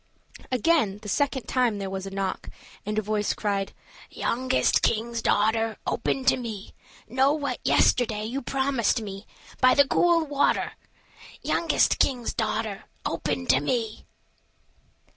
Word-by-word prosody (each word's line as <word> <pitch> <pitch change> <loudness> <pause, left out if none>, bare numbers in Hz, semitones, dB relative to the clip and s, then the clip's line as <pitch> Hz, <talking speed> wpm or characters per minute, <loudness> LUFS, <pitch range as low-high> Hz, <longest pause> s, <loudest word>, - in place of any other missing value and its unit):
Again, 255 -5 +2
the - - -8
second 265 +4 0
time 245 -5 +1
there 195 -1 -4
was 190 0 -4
a - - -4
knock, 195 -1 -3 0.4
and 210 0 -2
a 215 - +1
voice 210 0 -1
cried: 200 -2 -1 0.4
"Youngest 255 +2 +1
king's 230 +1 0
daughter, 220 +1 +1
Open 265 - -1
to 260 - +4
me; 225 -5 -7 0.3
Know 265 +4 +3
you - - -4
what 285 - -3
yesterday 220 -4 +2
You 255 +5 -3
promised 265 -3 0
me, 200 -1 -8 0.3
By 255 0 +5
the 280 -1 +5
cool 340 0 +3
water? 285 -1 +1 0.7
Youngest 335 - +2
king's 245 -4 +1
daughter, 215 -2 -2 0.2
Open 85 - -2
to 130 - +5
me." 220 - -2
230 Hz, 140 wpm, -26 LUFS, 210-265 Hz, 0.7 s, By